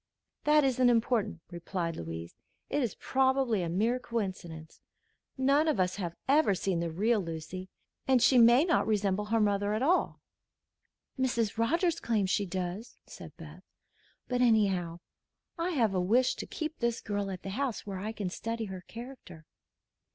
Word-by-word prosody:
"That 300 Hz, 0 st, +5 dB
isn't 255 Hz, -2 st, +3 dB
important," 230 Hz, -6 st, +1 dB
replied 170 Hz, -1 st, -3 dB
Louise. 80 Hz, 0 st, -7 dB, 0.4 s
"It 290 Hz, -, +1 dB
is 240 Hz, -5 st, -2 dB
probably 265 Hz, -5 st, +1 dB
a 170 Hz, -, -2 dB
mere 225 Hz, +8 st, +1 dB
coincidence. 185 Hz, -9 st, -5 dB, 0.6 s
None 280 Hz, +4 st, +3 dB
of 305 Hz, -10 st, +1 dB
us 185 Hz, +1 st, +1 dB
have 175 Hz, -4 st, -4 dB
ever 275 Hz, -7 st, +4 dB
seen 185 Hz, -1 st, -1 dB
the 170 Hz, 0 st, -1 dB
real 210 Hz, +6 st, +1 dB
Lucy, 165 Hz, +2 st, -6 dB, 0.4 s
and 260 Hz, -1 st, +5 dB
she 250 Hz, +2 st, +5 dB
may 240 Hz, +6 st, +6 dB
not 340 Hz, -, +2 dB
resemble 205 Hz, -1 st, +1 dB
her 225 Hz, +2 st, +1 dB
mother 205 Hz, 0 st, +1 dB
at 220 Hz, -, -1 dB
all." 350 Hz, +6 st, +1 dB, 1.0 s
"Mrs. 235 Hz, -4 st, 0 dB
Rogers 335 Hz, +8 st, +1 dB
claims 205 Hz, -5 st, 0 dB
she 205 Hz, -, +1 dB
does," 185 Hz, +5 st, -5 dB
said 160 Hz, -5 st, -12 dB
Beth. 165 Hz, +2 st, -11 dB, 0.7 s
"But 250 Hz, -1 st, 0 dB
anyhow, 195 Hz, -8 st, +2 dB, 0.5 s
I 335 Hz, +1 st, -2 dB
have 235 Hz, -, +1 dB
a 185 Hz, -, +1 dB
wish 235 Hz, +8 st, +3 dB
to -, -, -6 dB
keep 310 Hz, -1 st, -5 dB
this 235 Hz, -1 st, 0 dB
girl 205 Hz, -2 st, -3 dB
at 185 Hz, -2 st, -6 dB
the 195 Hz, -, -5 dB
house, 255 Hz, +2 st, -2 dB
where 195 Hz, -2 st, -5 dB
I 210 Hz, +3 st, -3 dB
can 200 Hz, -4 st, -4 dB
study 230 Hz, +3 st, -4 dB
her 190 Hz, -2 st, -7 dB
character." 230 Hz, -9 st, -10 dB
210 Hz, 165 wpm, -30 LUFS, 185-250 Hz, 1.0 s, may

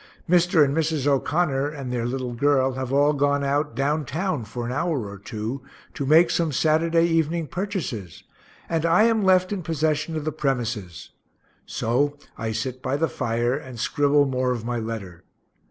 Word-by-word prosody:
Mr. 175 Hz, -3 st, +4 dB
and 140 Hz, +1 st, -1 dB
Mrs. 160 Hz, -3 st, 0 dB
O'Connor 145 Hz, 0 st, +1 dB
and 135 Hz, -4 st, -6 dB
their 120 Hz, -1 st, -1 dB
little 125 Hz, -1 st, -3 dB
girl 135 Hz, +1 st, +2 dB
have 130 Hz, 0 st, -4 dB
all 145 Hz, +2 st, +4 dB
gone 145 Hz, 0 st, +1 dB
out 140 Hz, -2 st, 0 dB
"down 145 Hz, +4 st, 0 dB
town" 160 Hz, 0 st, -2 dB
for 120 Hz, +3 st, -6 dB
an 120 Hz, -, -3 dB
hour 140 Hz, -5 st, -1 dB
or 100 Hz, -1 st, -9 dB
two, 110 Hz, +6 st, -5 dB, 0.3 s
to 140 Hz, -, -4 dB
make 160 Hz, +4 st, +6 dB
some 165 Hz, -2 st, +1 dB
Saturday 165 Hz, +3 st, +2 dB
evening 165 Hz, 0 st, +1 dB
purchases, 150 Hz, -, -5 dB, 0.4 s
and 165 Hz, -2 st, -1 dB
I 170 Hz, +5 st, +4 dB
am 225 Hz, -1 st, +3 dB
left 185 Hz, 0 st, +4 dB
in 195 Hz, -, -3 dB
possession 155 Hz, 0 st, -1 dB
of 155 Hz, -, -4 dB
the 155 Hz, -, 0 dB
premises 120 Hz, -, -3 dB, 0.6 s
so 140 Hz, +6 st, 0 dB, 0.2 s
I 115 Hz, -1 st, -3 dB
sit 125 Hz, +4 st, -4 dB
by 130 Hz, +2 st, -1 dB
the 165 Hz, +2 st, +1 dB
fire, 120 Hz, 0 st, -1 dB
and 130 Hz, -4 st, -8 dB
scribble 145 Hz, +4 st, +3 dB
more 130 Hz, -1 st, 0 dB
of 120 Hz, -3 st, -2 dB
my 120 Hz, 0 st, -2 dB
letter. 110 Hz, -6 st, -6 dB
140 Hz, 175 wpm, -24 LUFS, 125-160 Hz, 0.6 s, make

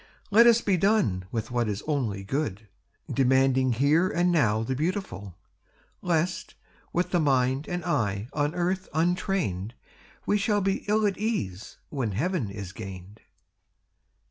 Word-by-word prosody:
Let 230 Hz, +4 st, +7 dB
us 235 Hz, 0 st, +6 dB
be 195 Hz, -3 st, +1 dB
done 185 Hz, -, +2 dB
with 115 Hz, 0 st, -3 dB
what 120 Hz, -2 st, 0 dB
is 105 Hz, -1 st, -3 dB
only 120 Hz, -10 st, -1 dB
good, 110 Hz, -3 st, -3 dB, 0.4 s
Demanding 130 Hz, -1 st, +3 dB
here 150 Hz, +9 st, +3 dB
and 175 Hz, +1 st, +1 dB
now 115 Hz, -10 st, +2 dB
the 130 Hz, +3 st, -2 dB
beautiful; 150 Hz, -, -3 dB, 0.7 s
Lest, 170 Hz, 0 st, -1 dB, 0.4 s
with 175 Hz, +1 st, -1 dB
the 175 Hz, -, +2 dB
mind 135 Hz, -1 st, +1 dB
and 175 Hz, -1 st, -4 dB
eye 105 Hz, -, -1 dB
on 145 Hz, +2 st, 0 dB
earth 185 Hz, +2 st, -1 dB
untrained, 160 Hz, -, 0 dB, 0.5 s
We 205 Hz, -, +2 dB
shall 205 Hz, +1 st, +1 dB
be 195 Hz, 0 st, -1 dB
ill 215 Hz, +1 st, +2 dB
at 200 Hz, -2 st, 0 dB
ease 115 Hz, -, -3 dB
when 125 Hz, -8 st, -2 dB
heaven 140 Hz, -, -1 dB
is 100 Hz, -2 st, -7 dB
gained. 95 Hz, 0 st, -9 dB
140 Hz, 145 wpm, -27 LUFS, 110-180 Hz, 0.7 s, Let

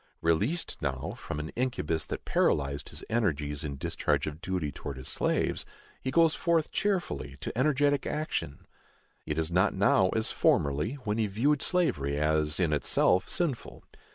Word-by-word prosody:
Released 105 Hz, -, 0 dB
now 70 Hz, +5 st, -2 dB
from 75 Hz, -10 st, -6 dB
an 75 Hz, +1 st, -4 dB
incubus 80 Hz, -, -1 dB
that -, -, -5 dB
paralyzed 70 Hz, -1 st, +1 dB
his -, -, -8 dB
energies 75 Hz, -10 st, -1 dB
in 70 Hz, -2 st, -4 dB
discharge 85 Hz, +4 st, 0 dB
of 75 Hz, +1 st, -6 dB
duty 90 Hz, -6 st, -2 dB
towards 70 Hz, 0 st, -7 dB
his 65 Hz, -, -8 dB
slaves, -, -, 0 dB, 0.4 s
he 130 Hz, -, -2 dB
goes 165 Hz, +2 st, +4 dB
forth 165 Hz, -2 st, +1 dB
cheerfully 190 Hz, -, -1 dB
to -, -, -5 dB
energetic 145 Hz, +2 st, +2 dB
action. 150 Hz, -, -3 dB, 0.6 s
It 75 Hz, 0 st, -2 dB
is 80 Hz, +1 st, 0 dB
not 95 Hz, +4 st, +3 dB
now 95 Hz, -1 st, +4 dB
as 110 Hz, 0 st, 0 dB
formerly, 75 Hz, -, +2 dB
when 105 Hz, +1 st, -1 dB
he 110 Hz, -, +2 dB
viewed 135 Hz, +9 st, +1 dB
slavery 70 Hz, -, +1 dB
as 75 Hz, +1 st, +1 dB
in 85 Hz, -4 st, +2 dB
itself 75 Hz, +5 st, +2 dB
sinful. 155 Hz, -9 st, -2 dB
90 Hz, 155 wpm, -29 LUFS, -, 0.6 s, goes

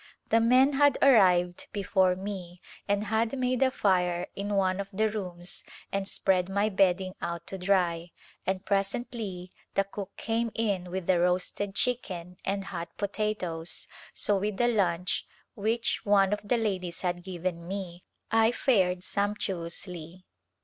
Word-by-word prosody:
The 225 Hz, -, +5 dB
men 255 Hz, +5 st, +5 dB
had 285 Hz, 0 st, +4 dB
arrived 180 Hz, -9 st, +4 dB
before 190 Hz, -2 st, +2 dB
me 185 Hz, -2 st, -6 dB, 0.3 s
and 205 Hz, 0 st, +1 dB
had 220 Hz, +4 st, 0 dB
made 255 Hz, 0 st, 0 dB
a 265 Hz, -, +5 dB
fire 180 Hz, -7 st, +1 dB
in 205 Hz, +1 st, -2 dB
one 190 Hz, -1 st, +2 dB
of 200 Hz, 0 st, -4 dB
the 215 Hz, +2 st, +1 dB
rooms 180 Hz, -4 st, -6 dB, 0.3 s
and 195 Hz, 0 st, -1 dB
spread 185 Hz, -3 st, +1 dB
mv 200 Hz, +1 st, 0 dB
bedding 185 Hz, -1 st, +3 dB
out 170 Hz, -1 st, -4 dB
to 190 Hz, -, -6 dB
dry, 180 Hz, -3 st, +1 dB, 0.4 s
and 190 Hz, 0 st, -1 dB
presently 195 Hz, -2 st, -2 dB, 0.2 s
the 195 Hz, -, +4 dB
cook 200 Hz, 0 st, -8 dB
came 230 Hz, +1 st, 0 dB
in 200 Hz, -5 st, -1 dB
with 185 Hz, -1 st, -4 dB
a 185 Hz, -2 st, +4 dB
roasted 180 Hz, +3 st, 0 dB
chicken 180 Hz, -9 st, -1 dB
and 195 Hz, 0 st, -1 dB
hot 170 Hz, -1 st, -4 dB
potatoes, 190 Hz, -6 st, -3 dB, 0.2 s
so 205 Hz, -2 st, +1 dB
with 205 Hz, 0 st, -2 dB
the 240 Hz, -, +3 dB
lunch 185 Hz, -6 st, +1 dB, 0.3 s
which 230 Hz, +2 st, 0 dB
one 200 Hz, -1 st, +4 dB
of 210 Hz, -, -1 dB
the 225 Hz, +4 st, +1 dB
ladies 185 Hz, -6 st, -2 dB
had 175 Hz, -1 st, -1 dB
given 175 Hz, -2 st, -4 dB
me 185 Hz, -2 st, -5 dB, 0.3 s
I 225 Hz, 0 st, +5 dB
fared 185 Hz, -9 st, +2 dB
sumptuously. 185 Hz, -3 st, -3 dB
195 Hz, 150 wpm, -29 LUFS, 180-210 Hz, 0.4 s, The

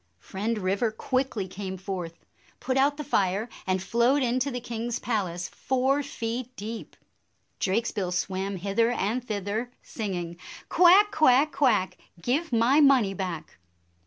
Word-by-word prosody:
" -, -, -45 dB
Friend 215 Hz, +4 st, -1 dB
River 200 Hz, +4 st, 0 dB
quickly 250 Hz, -3 st, -2 dB
came 190 Hz, 0 st, -6 dB
forth, 180 Hz, -3 st, -6 dB, 0.3 s
put 255 Hz, +1 st, -2 dB
out 280 Hz, +2 st, +3 dB
the 300 Hz, -, -4 dB
fire, 200 Hz, -3 st, 0 dB, 0.2 s
and 185 Hz, 0 st, 0 dB
flowed 245 Hz, +7 st, +2 dB
into 255 Hz, +3 st, +1 dB
the 245 Hz, -2 st, -3 dB
king's 235 Hz, 0 st, -4 dB
palace 185 Hz, -7 st, -2 dB
four 265 Hz, +2 st, 0 dB
feet 245 Hz, -1 st, -5 dB
deep. 220 Hz, +1 st, -7 dB, 0.6 s
Drakesbill 200 Hz, -2 st, -1 dB
swam 190 Hz, +2 st, -2 dB
hither 200 Hz, +5 st, +1 dB
and 240 Hz, +1 st, -1 dB
thither, 215 Hz, +1 st, -3 dB
sing 210 Hz, -5 st, -4 dB
ing, 170 Hz, -1 st, -5 dB, 0.3 s
"Quack, 380 Hz, +4 st, +6 dB
quack, 295 Hz, 0 st, +4 dB
quack! 245 Hz, -9 st, +2 dB, 0.2 s
Give 270 Hz, -, -1 dB
my 240 Hz, +5 st, +4 dB
money 260 Hz, -9 st, +5 dB
back." 180 Hz, -, -5 dB
230 Hz, 140 wpm, -27 LUFS, 190-255 Hz, 0.6 s, Quack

